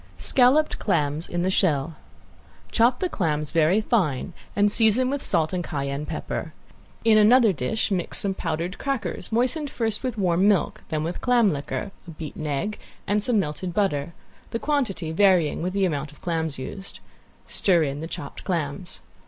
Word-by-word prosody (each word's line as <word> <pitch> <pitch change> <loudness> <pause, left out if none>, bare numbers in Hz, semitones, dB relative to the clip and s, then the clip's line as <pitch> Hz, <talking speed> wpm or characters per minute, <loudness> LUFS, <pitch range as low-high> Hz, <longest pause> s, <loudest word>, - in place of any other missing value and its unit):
~SCALLOPED 270 +4 +4
CLAMS 155 -5 0
IN 175 +1 -1
SHELL~ 160 -5 +1 0.8
Chop 240 +2 +3
the 370 - +2
clams 155 - -1
very 165 +5 +3
fine 185 - 0 0.2
and 205 0 +4
season 235 +4 +4
with 285 -1 -2
salt 165 -1 +1
and 180 -1 -1
cayenne 140 -2 -3
pepper. 160 0 -4 0.5
In 220 -1 +6
another 225 0 +6
dish 170 - -1
mix 180 -3 -1
some 195 -1 0
powdered 170 +1 -3
crackers, 270 -8 -3
moistened 255 +6 0
first 225 -5 -2
with 255 -4 -3
warm 185 0 +2
milk, 205 -4 +1
then 155 -1 -1
with 170 +2 -4
clam 240 -4 +4
liquor, 150 +8 -4 0.2
a - - -9
beaten 155 -1 -6
egg 150 +9 -2 0.3
and 205 +1 +1
some 245 -2 +2
melted 175 +1 -3
butter, 170 -6 0 0.3
the - - -2
quantity 230 - -1
varying 180 -4 +3
with 180 +2 -1
the 195 -1 +2
amount 150 -4 -2
of 150 - -19
clams 160 -3 -2
used; 190 +9 -7 0.5
stir 175 -4 +2
in 140 -1 -3
the 160 - -5
chopped 140 -4 -7
clams. 175 0 -3
185 Hz, 165 wpm, -24 LUFS, 155-215 Hz, 0.8 s, In